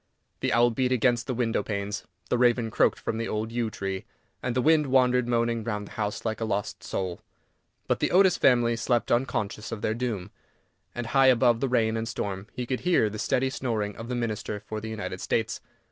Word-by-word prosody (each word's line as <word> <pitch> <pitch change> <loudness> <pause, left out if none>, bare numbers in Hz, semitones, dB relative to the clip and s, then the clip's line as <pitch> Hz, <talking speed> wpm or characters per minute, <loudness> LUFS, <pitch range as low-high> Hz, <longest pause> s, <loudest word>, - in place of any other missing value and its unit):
The - - 0
owl 120 +2 +4
beat 125 +2 0
against 120 -1 +2
the 130 - -1
window 115 -2 +1
panes, 100 0 -4 0.2
the 125 - +3
raven 120 -2 +3
croaked - - +3
from 110 - -3
the 115 - -2
old 110 +1 -2
yew 115 -1 -1
tree, 95 -2 -4 0.4
and 125 -1 -2
the 130 - +2
wind 155 -1 +4
wandered 125 -2 +3
moaning 115 -1 +1
round 105 -2 -3
the - - -13
house 105 0 -3
like 110 0 -2
a - - +1
lost 105 -2 -2
soul; 90 -2 -3 0.6
but - - 0
the - - +1
Otis 185 0 +5
family 120 -2 +4
slept 120 +1 0
unconscious 110 -4 -1
of 110 -2 -5
their 110 - +1
doom, 110 -5 -3 0.6
and 120 - -3
high 135 +2 +4
above 120 -2 +4
the 135 - 0
rain 115 -3 +2
and 110 0 -2
storm 100 -3 -4
he 125 - -4
could 130 +1 -2
hear 170 -12 +2
the 110 - -6
steady 130 +3 +1
snoring 110 -6 -2
of 115 +1 -8
the 125 - -1
Minister 110 -3 -3
for 110 0 -5
the 110 - -5
United 95 -4 -5
States. 115 0 -1
115 Hz, 210 wpm, -27 LUFS, 110-125 Hz, 0.6 s, Otis